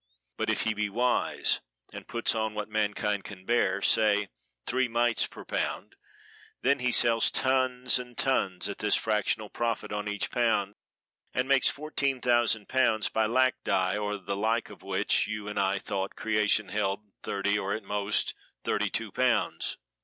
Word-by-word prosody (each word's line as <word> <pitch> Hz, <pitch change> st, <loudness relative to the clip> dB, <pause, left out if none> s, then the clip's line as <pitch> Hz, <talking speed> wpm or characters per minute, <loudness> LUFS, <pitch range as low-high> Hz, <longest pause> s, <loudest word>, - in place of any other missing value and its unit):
But -, -, -2 dB
if -, -, +1 dB
he 110 Hz, -, +1 dB
be 105 Hz, 0 st, -1 dB
wise 120 Hz, +4 st, +1 dB, 0.3 s
and -, -, -9 dB
puts 115 Hz, -, 0 dB
on 110 Hz, -1 st, -2 dB
what 105 Hz, -1 st, -3 dB
mankind 105 Hz, -1 st, -1 dB
can 95 Hz, -3 st, -11 dB
bear, 100 Hz, -4 st, +1 dB
say 105 Hz, -2 st, +3 dB, 0.4 s
three 130 Hz, +1 st, +1 dB
mites 120 Hz, 0 st, +2 dB
per -, -, -12 dB
pound, -, -, -3 dB, 0.7 s
then 140 Hz, +2 st, +3 dB
he 125 Hz, 0 st, +1 dB
sells 115 Hz, -1 st, +4 dB
tons 130 Hz, -1 st, +2 dB
and 125 Hz, -1 st, -10 dB
tons 95 Hz, -9 st, +1 dB
at 100 Hz, -, -6 dB
this 105 Hz, -1 st, +3 dB
fractional 105 Hz, -1 st, 0 dB
profit 115 Hz, -1 st, -2 dB
on 105 Hz, 0 st, -3 dB
each 105 Hz, -1 st, -1 dB
pound, 110 Hz, -5 st, +1 dB, 0.6 s
and 125 Hz, +1 st, 0 dB
makes 135 Hz, -1 st, +5 dB
fourteen 140 Hz, -3 st, -2 dB
thousand 120 Hz, -4 st, +2 dB
pounds 125 Hz, -5 st, +2 dB
by 110 Hz, -1 st, +1 dB
lac 130 Hz, +2 st, +2 dB
dye 95 Hz, +1 st, +1 dB
or 105 Hz, 0 st, -2 dB
the 100 Hz, 0 st, -4 dB
like 110 Hz, +3 st, 0 dB
of -, -, -13 dB
which -, -, +1 dB
you 105 Hz, -1 st, -5 dB
and 105 Hz, -1 st, -3 dB
I 100 Hz, 0 st, +1 dB
thought 95 Hz, 0 st, -3 dB
creation 105 Hz, -2 st, +1 dB
held 100 Hz, 0 st, -1 dB, 0.2 s
thirty 100 Hz, +1 st, 0 dB
or 100 Hz, 0 st, -2 dB
at 110 Hz, -, -6 dB
most 100 Hz, +1 st, 0 dB, 0.3 s
thirty -, -, 0 dB
two -, -, -2 dB
pounds. -, -, 0 dB
110 Hz, 170 wpm, -28 LUFS, 105-120 Hz, 0.7 s, makes